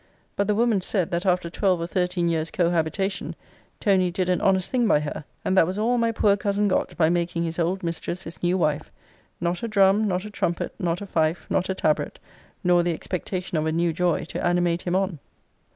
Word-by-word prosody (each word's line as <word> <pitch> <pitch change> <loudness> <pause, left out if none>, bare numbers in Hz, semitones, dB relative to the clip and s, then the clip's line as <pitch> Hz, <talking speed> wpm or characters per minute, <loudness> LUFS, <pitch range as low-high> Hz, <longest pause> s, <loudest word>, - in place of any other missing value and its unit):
But 200 - 0
the 210 - +2
woman 225 -3 +2
said, 185 -2 -1
that 175 +3 -1
after 180 -1 +2
twelve 185 +1 +1
or 165 - -2
thirteen 180 0 0
years' 165 -1 0
cohabitation, 175 +3 -1 0.4
Tony 190 -4 +3
did 185 +1 -1
an 180 - +1
honest 190 -2 +2
thing 245 -3 +2
by 150 - +4
her. 150 0 -5 0.2
And 190 - +1
that 165 - +5
was 185 +2 -3
all 235 +3 +1
my 230 0 +2
poor 210 -2 +3
cousin 205 +1 0
got 190 - -1
by 160 -2 +4
making 170 -1 0
his 165 0 -3
old 180 +3 0
mistress 170 +1 -3
his 165 - -9
new 180 +1 +2
wife 150 -3 0 0.5
not 175 +1 -1
a 230 - -2
drum, 205 0 +4
not 185 0 -1
a 210 - -7
trumpet, 175 -4 -2
not 175 0 -1
a - - -4
fife, 160 -2 0
not 185 - +1
a 190 - 0
tabret, 155 -4 0 0.5
nor 175 -1 +4
the 170 -1 0
expectation 180 -1 -3
of 155 - -1
a - - +1
new 170 +1 +1
joy, 175 0 +1
to - - -5
animate 175 -1 +1
him 180 0 -1
on! 190 -4 0
180 Hz, 215 wpm, -24 LUFS, 170-195 Hz, 0.5 s, that